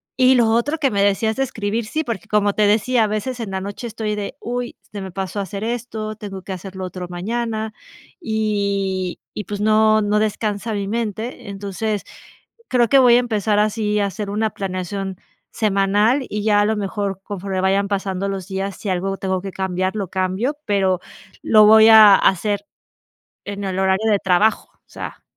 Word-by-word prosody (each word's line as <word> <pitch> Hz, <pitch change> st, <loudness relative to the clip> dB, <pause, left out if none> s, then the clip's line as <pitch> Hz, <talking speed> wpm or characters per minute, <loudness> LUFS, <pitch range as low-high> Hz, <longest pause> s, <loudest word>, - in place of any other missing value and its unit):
Y 260 Hz, 0 st, +5 dB
lo 240 Hz, -2 st, +4 dB
otro 235 Hz, +8 st, +1 dB
que 280 Hz, -4 st, +1 dB
me 200 Hz, -1 st, +1 dB
decías 205 Hz, +2 st, +2 dB
de 270 Hz, -, +2 dB
escribir, 220 Hz, -2 st, -3 dB
sí, 310 Hz, +8 st, -2 dB
porque 230 Hz, -, -5 dB
como 205 Hz, -1 st, +2 dB
te 210 Hz, 0 st, +3 dB
decía, 225 Hz, +3 st, +3 dB
a -, -, -1 dB
veces 215 Hz, +4 st, -3 dB
en 225 Hz, -3 st, -4 dB
la 190 Hz, 0 st, -3 dB
noche 200 Hz, +5 st, -6 dB
estoy 220 Hz, -1 st, -3 dB
de: 205 Hz, -1 st, -4 dB
"Uy, 245 Hz, 0 st, -4 dB, 0.2 s
se 205 Hz, -, -6 dB
me 190 Hz, -, -6 dB
pasó 190 Hz, +2 st, -4 dB
hacer 200 Hz, +1 st, -4 dB
esto, 220 Hz, -2 st, -4 dB
tengo 195 Hz, -3 st, -8 dB
que 190 Hz, -, -5 dB
hacer 190 Hz, +1 st, -8 dB
lo 190 Hz, 0 st, -4 dB
otro 180 Hz, 0 st, -6 dB
mañana", 220 Hz, +4 st, -3 dB, 0.5 s
y 200 Hz, -, -1 dB, 0.2 s
y, 210 Hz, -, -4 dB
pues, 205 Hz, +2 st, -5 dB
no, 215 Hz, 0 st, +4 dB
no 205 Hz, +1 st, +2 dB
descansa 215 Hz, 0 st, -1 dB
mi 200 Hz, -1 st, -2 dB
mente. 220 Hz, 0 st, -4 dB
Entonces 200 Hz, +1 st, -3 dB, 0.7 s
creo 240 Hz, -2 st, +3 dB
que 275 Hz, -, +6 dB
voy 245 Hz, -2 st, +6 dB
a -, -, +6 dB
empezar 215 Hz, -4 st, 0 dB
así 210 Hz, 0 st, +1 dB
a 205 Hz, -, +2 dB
hacer 205 Hz, +1 st, -5 dB
una 215 Hz, +1 st, 0 dB
planeación 190 Hz, 0 st, -4 dB, 0.3 s
semanal 210 Hz, +5 st, +2 dB
y 210 Hz, 0 st, -3 dB
ya 205 Hz, -1 st, +4 dB
a -, -, +3 dB
lo 220 Hz, +1 st, +1 dB
mejor 200 Hz, -1 st, -3 dB
conforme 195 Hz, -2 st, -4 dB
vayan 195 Hz, +1 st, +2 dB
pasando 195 Hz, -1 st, -2 dB
los 195 Hz, -2 st, -5 dB
días, 195 Hz, 0 st, -3 dB
si 205 Hz, -, -5 dB
algo 190 Hz, +1 st, -1 dB
tengo 190 Hz, -1 st, -2 dB
que 195 Hz, +1 st, -6 dB
cambiar, 185 Hz, +1 st, -2 dB
lo 200 Hz, -3 st, -2 dB
cambio, 190 Hz, +10 st, -1 dB
pero 190 Hz, -3 st, +1 dB, 0.4 s
lo 215 Hz, -1 st, +6 dB
voy 220 Hz, +1 st, +8 dB
a 215 Hz, -2 st, +9 dB
hacer 205 Hz, +2 st, +1 dB, 0.8 s
en 200 Hz, 0 st, -5 dB
el 190 Hz, -1 st, -3 dB
horario 190 Hz, +3 st, +2 dB
de 205 Hz, -, +3 dB
trabajo, 190 Hz, +4 st, +2 dB
o -, -, -37 dB
sea -, -, -8 dB
205 Hz, 190 wpm, -20 LUFS, 195-220 Hz, 0.8 s, a